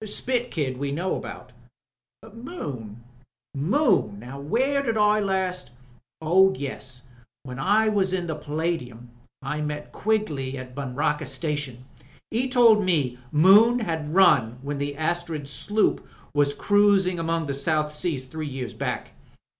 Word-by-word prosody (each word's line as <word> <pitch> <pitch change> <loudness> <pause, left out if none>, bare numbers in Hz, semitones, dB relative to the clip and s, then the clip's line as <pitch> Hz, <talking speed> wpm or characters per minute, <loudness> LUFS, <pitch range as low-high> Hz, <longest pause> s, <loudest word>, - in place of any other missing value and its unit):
Spit 245 +3 -2
Kid 135 -5 -2
we 140 0 -2
know 175 +6 -1
about." 125 - -8 0.8
"Moon 135 - -7 0.3
— 120 +3 -68
Moon! 180 - +2
Now 125 +5 -9
where 260 - +1
did 230 -5 -1
I 210 0 +4
last...? 190 -7 -1 0.5
Oh 185 +4 +4
yes, 130 -3 -7 0.4
when 130 -2 -8
I 210 +8 +3
was 200 -3 +1
in 185 -2 -1
the 165 - -3
Palladium! 150 -6 -4 0.3
I 150 +3 -3
met 150 0 -4
Quigley 155 -12 -1
at 130 -1 -8
Buncrana 140 +2 -2
Station. 145 -6 -4 0.5
He 250 +4 0
told 230 -4 +5
me 145 -9 0
Moon 210 +10 +6
'ad 160 -7 -3
run 135 -10 +4
when 140 0 -4
the 145 0 -3
Astriid 160 -2 -2
sloop 210 +9 0 0.3
was 145 -1 +2
cruising 200 -3 +3
among 165 0 -1
the 140 - -3
South 150 +2 0
Seas 150 -4 -2
three 155 +4 -6
years 130 -3 -5
back. - - -4
155 Hz, 140 wpm, -25 LUFS, 140-200 Hz, 0.8 s, Moon